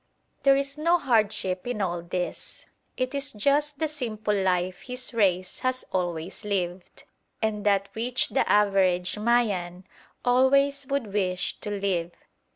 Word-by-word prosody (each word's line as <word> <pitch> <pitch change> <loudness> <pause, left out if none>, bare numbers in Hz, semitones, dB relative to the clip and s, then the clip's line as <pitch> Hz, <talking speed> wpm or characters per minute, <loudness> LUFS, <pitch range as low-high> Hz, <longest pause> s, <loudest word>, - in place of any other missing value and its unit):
There 275 -1 +5
is 275 +2 -2
no 335 +3 +4
hardship 215 - 0
in 245 -3 -2
all 175 -3 -1
this. 180 +1 -5 0.3
It 255 +1 -1
is 280 0 0
just 285 +7 +1
the 315 - 0
simple 225 -8 -3
life 185 -2 0
his 250 0 -4
race 185 -5 +1
has 255 0 -1
always 175 -1 -2
lived, 185 -3 -3 0.4
and 215 -2 -1
that 200 -1 +3
which 245 +3 0
the 270 - +1
average 195 -2 +3
Mayan 200 -6 +1 0.4
always 275 +2 +3
would 275 -8 -2
wish 185 -3 -1
to 210 - -6
live. 195 -4 -1
210 Hz, 140 wpm, -26 LUFS, 185-255 Hz, 0.4 s, There